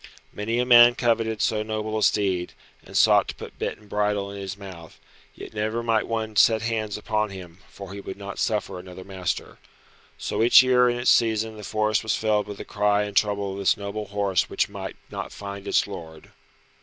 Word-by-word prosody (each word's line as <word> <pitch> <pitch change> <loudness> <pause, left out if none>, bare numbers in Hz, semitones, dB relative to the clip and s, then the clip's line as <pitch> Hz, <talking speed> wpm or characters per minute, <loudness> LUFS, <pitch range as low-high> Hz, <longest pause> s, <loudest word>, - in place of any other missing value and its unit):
Many 115 +3 -2
a 125 - +1
man 120 -1 +8
coveted 115 -2 0
so 110 -3 +1
noble 110 0 -3
a 110 - -1
steed, 95 -5 +1 0.3
and - - -5
sought - - +5
to - - -6
put - - -11
bit - - -3
and 105 - -20
bridle 105 -1 -1
in 100 - -8
his 95 +1 -6
mouth, 90 -5 -11 0.4
yet - - -10
never 110 +2 -2
might 115 -2 +1
one 110 -1 -3
set 110 +1 +4
hands 110 -2 -2
upon 105 0 -1
him, 90 -3 -10
for 100 -1 -10
he 100 - -7
would 95 - -7
not 100 0 -7
suffer 105 -4 -1
another 90 0 -10
master. 95 -3 -4 0.6
So - - -2
each 120 +2 +8
year 125 -1 +4
in 120 - -1
its 120 - +3
season 110 -1 +2
the 105 - -10
forest 110 +1 0
was 110 - 0
filled 105 -1 0
with 105 -1 -7
the - - -8
cry 105 0 +1
and 105 -1 -6
the - - +8
trouble 100 -2 -2
of 95 - -6
this 100 - +2
noble 105 +1 -5
horse 100 -2 0
which - - 0
might - - -7 0.2
not - - -5
find 100 -1 -8
its - - +2
lord. 80 -6 -10
105 Hz, 210 wpm, -24 LUFS, 100-110 Hz, 0.6 s, man